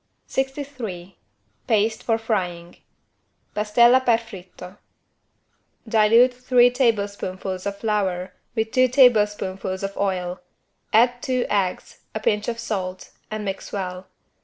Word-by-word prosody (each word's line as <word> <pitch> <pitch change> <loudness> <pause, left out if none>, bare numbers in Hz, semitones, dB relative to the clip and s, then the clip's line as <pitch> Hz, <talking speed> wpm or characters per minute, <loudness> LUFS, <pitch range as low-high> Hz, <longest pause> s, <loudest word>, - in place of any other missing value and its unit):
63 265 -10 -5 0.5
PASTE 220 -1 +1
FOR 225 -1 +1
FRYING 180 -6 -3 0.8
(Pastella 235 +5 +4
per 235 -3 +4
fritto) 190 -3 -12 1.1
Dilute 225 +3 +5
three 245 0 +4
teaspoonfuls 200 -6 -1
of 200 0 -4
flour 195 -4 -1 0.2
with 220 -1 -1
two 255 0 +4
teaspoonfuls 210 -7 +2
of 195 0 -4
oil. 185 -2 -2 0.5
Add 245 +2 +4
two 255 -1 0
eggs, 195 -3 -2
a - - -1
pinch 210 -1 0
of 235 -1 -2
salt, 190 -5 -4 0.2
and 215 -1 -4
mix 195 -1 -5
well. 185 -2 -5
210 Hz, 110 wpm, -23 LUFS, 190-235 Hz, 1.1 s, Dilute